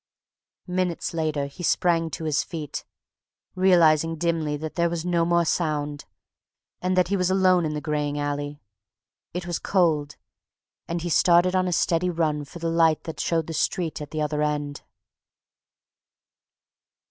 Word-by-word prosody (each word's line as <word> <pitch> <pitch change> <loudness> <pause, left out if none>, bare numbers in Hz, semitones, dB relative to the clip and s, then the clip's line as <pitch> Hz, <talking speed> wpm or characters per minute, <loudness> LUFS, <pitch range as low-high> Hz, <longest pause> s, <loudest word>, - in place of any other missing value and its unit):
_ - - -5
Minutes 180 -2 -1
later 155 -3 -1
he 140 +5 -10
sprang 170 -1 +2
to 160 - -6
his 155 -3 +1
feet, 155 -6 -6 0.7
realizing 165 -4 +4
dimly 160 -2 -1
that 155 +1 -6
there 170 -1 +1
was 170 0 -3
no 170 -2 +2
more 170 0 +2
sound, 150 -3 -1 0.8
and 185 0 0
that 180 -1 +3
he 200 - +1
was 180 -2 +1
alone 185 -2 +3
in 150 - -3
the 150 - -3
graying 150 -1 -1
alley. 145 0 -3 0.8
It 180 -1 -3
was 175 -1 -2
cold, 155 -6 +1 0.7
and 170 0 -3
he 175 - -2
started 175 +2 +4
on 185 0 +2
a - - -1
steady 170 +1 +1
run 155 -4 -1
for 175 - -11
the 165 0 -3
light 165 -2 +3
that 160 - -7
showed 165 -2 0
the 165 - -6
street 165 0 -1
at 145 - -7
the 155 -1 -2
other 150 0 -1
end. 145 -1 -2
165 Hz, 160 wpm, -25 LUFS, 150-175 Hz, 0.8 s, realizing